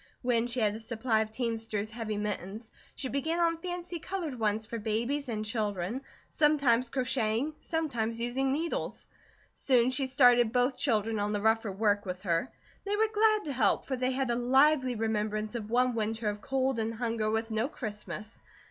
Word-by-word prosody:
When 240 Hz, -1 st, +2 dB
she 245 Hz, 0 st, -2 dB
had 210 Hz, -1 st, +2 dB
a 220 Hz, -, -6 dB
supply 225 Hz, 0 st, 0 dB
of 215 Hz, 0 st, -3 dB
teamster's 225 Hz, -2 st, -2 dB
heavy 215 Hz, -2 st, -3 dB
mittens, 210 Hz, +1 st, -4 dB, 0.2 s
she 265 Hz, -, -3 dB
began 315 Hz, +6 st, -1 dB
on 335 Hz, -1 st, +2 dB
fancy 355 Hz, -1 st, -4 dB
coloured 325 Hz, -8 st, -4 dB
ones 215 Hz, 0 st, 0 dB
for 230 Hz, +2 st, -5 dB
babies 235 Hz, +6 st, -1 dB
and 215 Hz, -2 st, -2 dB
children, 210 Hz, 0 st, -2 dB, 0.3 s
sometimes 275 Hz, -6 st, +3 dB
crocheting, 250 Hz, +1 st, 0 dB
sometimes 240 Hz, -9 st, -2 dB
using 255 Hz, +3 st, 0 dB
needles. 325 Hz, +4 st, -2 dB, 0.5 s
Soon 250 Hz, -2 st, +3 dB
she 265 Hz, +1 st, 0 dB
started 245 Hz, -3 st, +5 dB
both 250 Hz, +2 st, +2 dB
children 220 Hz, -5 st, +1 dB
on 205 Hz, +1 st, 0 dB
the 205 Hz, -, 0 dB
rougher 220 Hz, -1 st, +2 dB
work 205 Hz, +1 st, +1 dB
with 185 Hz, 0 st, -6 dB
her. 170 Hz, +4 st, 0 dB, 0.3 s
They 405 Hz, 0 st, -1 dB
were 435 Hz, +1 st, +2 dB
glad 430 Hz, 0 st, +3 dB
to 290 Hz, -, -2 dB
help 260 Hz, -, +2 dB
for 265 Hz, -, -2 dB
they 255 Hz, 0 st, 0 dB
had 260 Hz, -1 st, 0 dB
a -, -, +1 dB
lively 260 Hz, +1 st, +3 dB
remembrance 215 Hz, -1 st, -1 dB
of 220 Hz, -3 st, -5 dB
one 250 Hz, +2 st, +3 dB
winter 220 Hz, 0 st, -1 dB
of 205 Hz, 0 st, -5 dB
cold 265 Hz, -1 st, 0 dB
and 225 Hz, +1 st, -2 dB
hunger, 225 Hz, -2 st, -1 dB
with 225 Hz, +1 st, -1 dB
no 220 Hz, +3 st, +1 dB
Christmas. 215 Hz, -2 st, -6 dB
235 Hz, 180 wpm, -30 LUFS, 215-265 Hz, 0.5 s, started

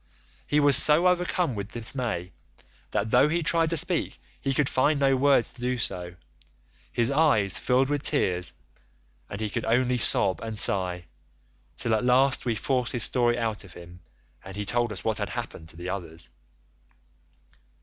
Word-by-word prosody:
He 150 Hz, -, +2 dB
was 145 Hz, -2 st, +5 dB
so 155 Hz, +4 st, +5 dB
overcome 180 Hz, -4 st, 0 dB
with 100 Hz, -2 st, -7 dB
dismay 110 Hz, -6 st, -4 dB, 0.6 s
that 110 Hz, +2 st, -2 dB
though 130 Hz, +4 st, +4 dB
he 170 Hz, +2 st, -1 dB
tried 165 Hz, +1 st, +2 dB
to 165 Hz, -, +2 dB
speak -, -, +1 dB, 0.2 s
he 135 Hz, -, -1 dB
could 135 Hz, +1 st, +1 dB
find 140 Hz, +3 st, +1 dB
no 135 Hz, -1 st, +3 dB
words 135 Hz, -2 st, +2 dB
to 120 Hz, -, -14 dB
do 125 Hz, +1 st, -1 dB
so; 90 Hz, -6 st, -4 dB, 0.8 s
his 120 Hz, +2 st, 0 dB
eyes 135 Hz, -, +2 dB
filled 130 Hz, +1 st, +1 dB
with 145 Hz, 0 st, -2 dB
tears 90 Hz, -13 st, 0 dB, 0.8 s
and 100 Hz, -, -7 dB
he 110 Hz, -, -2 dB
could 115 Hz, -, -3 dB
only 125 Hz, +2 st, +1 dB
sob 95 Hz, -4 st, +3 dB
and 110 Hz, -1 st, -6 dB
sigh, 90 Hz, -3 st, 0 dB, 0.7 s
till 115 Hz, -, -1 dB
at 110 Hz, -, 0 dB
last 130 Hz, +2 st, +2 dB
we 120 Hz, -2 st, 0 dB
forced 125 Hz, +1 st, -1 dB
his 120 Hz, -3 st, +1 dB
story 120 Hz, -2 st, +1 dB
out 110 Hz, -3 st, -3 dB
of 95 Hz, -3 st, -14 dB
him, 85 Hz, 0 st, -13 dB, 0.4 s
and 95 Hz, 0 st, -10 dB
he 105 Hz, 0 st, -4 dB
told 120 Hz, +2 st, +1 dB
us 100 Hz, -, -8 dB
what 110 Hz, -1 st, -1 dB
had 105 Hz, -1 st, -3 dB
happened 105 Hz, -9 st, -7 dB
to 80 Hz, -, -14 dB
the 90 Hz, +1 st, -6 dB
others. 85 Hz, -4 st, -7 dB
120 Hz, 175 wpm, -26 LUFS, 100-135 Hz, 0.8 s, was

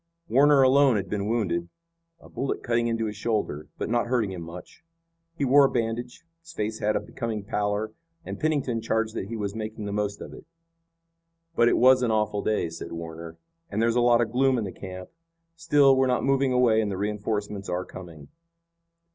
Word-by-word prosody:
Warner 140 Hz, +1 st, +5 dB
alone 135 Hz, -1 st, +5 dB
had 100 Hz, -2 st, -3 dB
been 105 Hz, -1 st, -2 dB
wounded, 90 Hz, -7 st, -1 dB, 0.5 s
a -, -, -16 dB
bullet 135 Hz, -, -3 dB
cutting 120 Hz, -1 st, +1 dB
into 115 Hz, -1 st, -1 dB
his 105 Hz, -1 st, -4 dB
shoulder, 105 Hz, -9 st, -2 dB
but -, -, -3 dB
not 120 Hz, +1 st, 0 dB
hurting 120 Hz, -5 st, 0 dB
him 90 Hz, -2 st, -6 dB
much. 85 Hz, -, -11 dB, 0.5 s
He 140 Hz, -, -1 dB
wore 140 Hz, +2 st, +6 dB
a -, -, +2 dB
bandage, 120 Hz, +3 st, -3 dB, 0.2 s
his 165 Hz, -, -14 dB
face 110 Hz, +1 st, -3 dB
had 105 Hz, +1 st, 0 dB
a -, -, +2 dB
becoming 110 Hz, -3 st, -5 dB
pallor, 105 Hz, +1 st, -2 dB, 0.3 s
and -, -, -6 dB
Pennington 140 Hz, -7 st, 0 dB
charged 110 Hz, 0 st, -1 dB
that 95 Hz, -, -4 dB
he 115 Hz, +1 st, -5 dB
was 100 Hz, -2 st, -3 dB
making 110 Hz, -1 st, -5 dB
the 100 Hz, -, -4 dB
most 100 Hz, 0 st, -2 dB
of -, -, -9 dB
it. -, -, -13 dB, 1.1 s
"But 120 Hz, -, +4 dB
it -, -, +2 dB
was 130 Hz, +1 st, +6 dB
an 125 Hz, -, +1 dB
awful 105 Hz, -2 st, 0 dB
day," 105 Hz, -5 st, 0 dB
said 85 Hz, +1 st, -8 dB
Warner, 80 Hz, 0 st, -8 dB, 0.3 s
"and 100 Hz, -, -3 dB
there's 115 Hz, +1 st, +2 dB
a 120 Hz, -, +3 dB
lot 120 Hz, 0 st, +4 dB
of 115 Hz, -2 st, -1 dB
gloom 130 Hz, +1 st, +2 dB
in 115 Hz, -, -1 dB
the 95 Hz, -, -5 dB
camp. 95 Hz, -1 st, -9 dB, 0.5 s
Still, 145 Hz, -5 st, +4 dB
we're 130 Hz, 0 st, +3 dB
not 125 Hz, -1 st, +1 dB
moving 135 Hz, -1 st, +2 dB
away 120 Hz, -3 st, +4 dB
and 105 Hz, -, -1 dB
the 95 Hz, -, -3 dB
reinforcements 105 Hz, -1 st, -3 dB
are 90 Hz, +1 st, -2 dB
coming." 85 Hz, -5 st, -11 dB
110 Hz, 200 wpm, -26 LUFS, 100-125 Hz, 1.1 s, wore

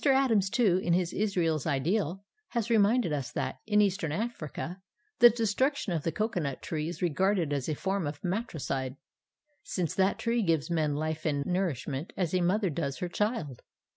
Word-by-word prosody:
Adams, 265 Hz, -8 st, +3 dB
too, 210 Hz, -6 st, +3 dB
in 175 Hz, -2 st, +1 dB
his 175 Hz, -1 st, +1 dB
Israel's 170 Hz, -7 st, 0 dB
Ideal, 170 Hz, +6 st, 0 dB, 0.2 s
has 235 Hz, -1 st, -2 dB
reminded 220 Hz, -4 st, +3 dB
us 135 Hz, -5 st, -3 dB
that, -, -, -2 dB
in 210 Hz, -1 st, +4 dB
Eastern 190 Hz, -6 st, +1 dB
Africa, 180 Hz, -, -4 dB, 0.4 s
the 240 Hz, -, +10 dB
destruction 235 Hz, +1 st, 0 dB
of 165 Hz, -, 0 dB
the 165 Hz, -, -1 dB
cocoanut 180 Hz, -, -2 dB
tree 155 Hz, -1 st, -2 dB
is 175 Hz, -, -6 dB
regarded 175 Hz, -1 st, +1 dB
as 140 Hz, -1 st, -2 dB
a 155 Hz, -, 0 dB
form 190 Hz, 0 st, -1 dB
of 145 Hz, 0 st, -5 dB
matricide, 155 Hz, -, -2 dB, 0.7 s
since 175 Hz, -5 st, -2 dB
that 190 Hz, +1 st, +2 dB
tree 235 Hz, 0 st, 0 dB
gives 165 Hz, -5 st, +1 dB
men 155 Hz, -3 st, +1 dB
life 155 Hz, +1 st, -2 dB
and 145 Hz, -3 st, 0 dB
nourishment 160 Hz, -5 st, -2 dB
as 180 Hz, -3 st, -1 dB
a 185 Hz, -, +2 dB
mother 190 Hz, +1 st, +2 dB
does 140 Hz, -3 st, -2 dB
her 180 Hz, -, -3 dB
child. 210 Hz, -, -2 dB
180 Hz, 170 wpm, -29 LUFS, 155-210 Hz, 0.7 s, the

